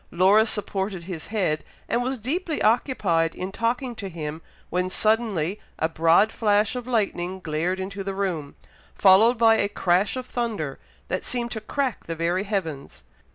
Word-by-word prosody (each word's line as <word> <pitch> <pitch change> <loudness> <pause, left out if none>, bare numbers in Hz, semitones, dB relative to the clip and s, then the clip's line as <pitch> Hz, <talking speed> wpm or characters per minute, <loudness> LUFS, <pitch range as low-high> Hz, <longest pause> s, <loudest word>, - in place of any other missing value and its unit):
Laura 195 +5 +4
supported 195 -3 -3
his 170 -3 -6
head, 180 -9 0 0.2
and 235 - +1
was 260 +2 -1
deeply 310 - -2
occupied 200 - +2
in 185 +1 -4
talking 240 +4 -1
to 200 -4 -6
him, 160 -2 -6 0.3
when 180 +1 0
suddenly 215 -4 +1 0.2
a 160 - +1
broad 165 +6 +4
flash 210 +1 +2
of 250 -1 -5
lightning 190 -6 -1
glared 170 +2 -1
into 195 +1 -4
the 195 0 -4
room, 175 -8 -3 0.4
followed 210 +5 +6
by 225 -1 +5
a 200 - +1
crash 190 +1 +1
of 255 - -4
thunder, 220 - -3 0.3
that 185 - -2
seemed 240 -1 -2
to 220 - -4
crack 260 +2 -2
the 165 - -3
very 175 +4 0
heavens. 165 - -4
195 Hz, 160 wpm, -25 LUFS, 175-225 Hz, 0.4 s, followed